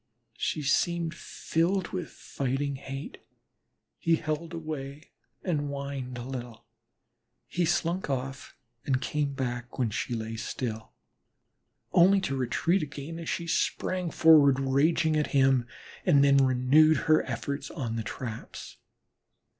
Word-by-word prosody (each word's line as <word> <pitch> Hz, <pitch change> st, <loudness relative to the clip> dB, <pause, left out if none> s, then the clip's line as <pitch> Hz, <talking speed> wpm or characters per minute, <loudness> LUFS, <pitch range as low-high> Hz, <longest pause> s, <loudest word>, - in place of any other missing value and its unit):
She 155 Hz, -, -1 dB
seemed 170 Hz, +4 st, +1 dB
filled 170 Hz, +2 st, -1 dB
with 185 Hz, -2 st, -4 dB
fighting 140 Hz, +1 st, -3 dB
hate. 135 Hz, +1 st, -7 dB, 0.8 s
He 165 Hz, -, +3 dB
held 155 Hz, +1 st, -3 dB
away 150 Hz, -3 st, -6 dB, 0.3 s
and 170 Hz, -5 st, 0 dB
whined 140 Hz, -3 st, -5 dB
a 120 Hz, -, -5 dB
little; 120 Hz, -3 st, -7 dB, 0.8 s
he 175 Hz, 0 st, -1 dB
slunk 170 Hz, +1 st, 0 dB
off 135 Hz, -1 st, -4 dB, 0.3 s
and 130 Hz, -2 st, +1 dB
came 145 Hz, 0 st, -2 dB
back 125 Hz, -2 st, -4 dB
when 120 Hz, -4 st, 0 dB
she 120 Hz, +3 st, -2 dB
lay 110 Hz, 0 st, -4 dB
still, 115 Hz, -2 st, -5 dB, 1.0 s
only 190 Hz, +3 st, +6 dB
to 135 Hz, -7 st, -2 dB
retreat 135 Hz, +9 st, +1 dB
again, 150 Hz, +2 st, -6 dB
as 165 Hz, -, -5 dB
she 170 Hz, -, -2 dB
sprang 180 Hz, +1 st, -1 dB
forward, 150 Hz, -5 st, +6 dB
raging 155 Hz, +4 st, +2 dB
at 150 Hz, -1 st, +1 dB
him, 135 Hz, -2 st, +4 dB, 0.4 s
and 145 Hz, -6 st, +5 dB
then 140 Hz, 0 st, +5 dB
renewed 135 Hz, +4 st, +5 dB
her 155 Hz, 0 st, +5 dB
efforts 140 Hz, 0 st, -3 dB
at 120 Hz, -8 st, -4 dB
the 115 Hz, -, -1 dB
traps. 115 Hz, 0 st, -7 dB
140 Hz, 130 wpm, -28 LUFS, 130-165 Hz, 1.0 s, only